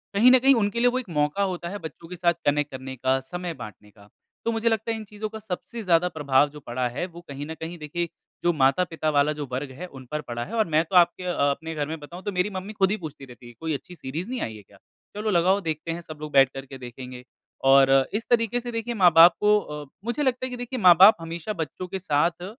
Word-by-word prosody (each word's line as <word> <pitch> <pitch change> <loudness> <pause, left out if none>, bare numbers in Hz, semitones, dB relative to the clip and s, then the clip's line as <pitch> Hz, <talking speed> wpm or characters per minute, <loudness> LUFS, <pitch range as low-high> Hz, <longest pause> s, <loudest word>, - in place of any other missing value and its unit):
कहीं 240 +5 +7
न 260 - +7
कहीं 270 +2 +5
उनके 210 0 0
लिए 245 - +4
वो 255 - -1
एक 230 - -9
मौका 150 +5 0
होता 180 -3 -3
है 205 - -5
बच्चों 165 +1 -9
के 180 - -7
साथ 170 0 +2
कनेक्ट 145 0 +1
करने 130 0 -7
का 130 +1 +1
समय 175 +6 -6
बाँटने 105 - -11
का। 100 0 -19 0.4
तो 230 - +1
मुझे 225 0 +1
लगता 225 0 -1
है 225 - -2
इन 220 - -7
चीजों 210 +1 -6
का 220 0 -8
सबसे 220 +3 -6
ज़्यादा 180 -1 +3
प्रभाव 145 -3 +2
जो 150 - -11
पड़ा 125 -2 -2
है 125 +8 -3
वो 170 -1 -12
कहीं 140 +1 -6
न 160 - -5
कहीं 165 +2 -6
देखिए 165 +3 -3 0.3
जो 175 - +3
माता-पिता 155 +3 +1
वाला 150 0 +3
जो 150 -1 -5
वर्ग 135 +2 -3
है 150 +8 -8
उन 135 -5 -12
पर 150 0 -2
पड़ा 120 -3 -5
है, 220 - -10
और 220 - +3
मैं 155 0 +2
तो 185 - -5
आपके 175 +1 +4
अ, 180 - -1 0.2
अपने 160 +3 -5
घर 150 -1 -2
में 160 0 -5
बताऊँ 170 +5 -10
तो 205 - -2
मेरी 180 +2 0
मम्मी 190 +2 -6
खुद 195 -2 +2
ही 210 - 0
पूछती 155 -6 -9
रहती 125 -1 -14
है। 120 - -12
कोई 160 -1 -2
अच्छी 180 +5 -7
सीरीज़ 160 - -6
नहीं 255 -1 -3
आयी 110 -1 -4
है 105 - -14
क्या? 100 +1 -21 0.4
चलो 215 +1 -1
लगाओ 185 +3 +3
देखते 160 -1 -3
हैं 170 +1 -5
सब 155 -2 -10
लोग 150 -1 -6
बैठ 135 -2 +6
करके 135 0 -8
देखेंगे। 125 0 -9 0.4
और 135 0 +6 0.2
इस 220 +3 -2
तरीके 235 0 +2
से 240 0 -6
देखिए 230 +1 -3
माँ-बाप 175 -4 +7
को 210 0 +4
अ, 150 -6 -7 0.2
मुझे 240 +5 -1
लगता 255 -1 0
है 255 - -4
कि 250 - -6
देखिए 245 +1 -5
माँ-बाप 185 +2 +8
हमेशा 165 +5 -5
बच्चों 180 +4 -8
के 190 +1 -5
साथ 170 +1 0
170 Hz, 260 wpm, -25 LUFS, 145-205 Hz, 0.4 s, माँ-बाप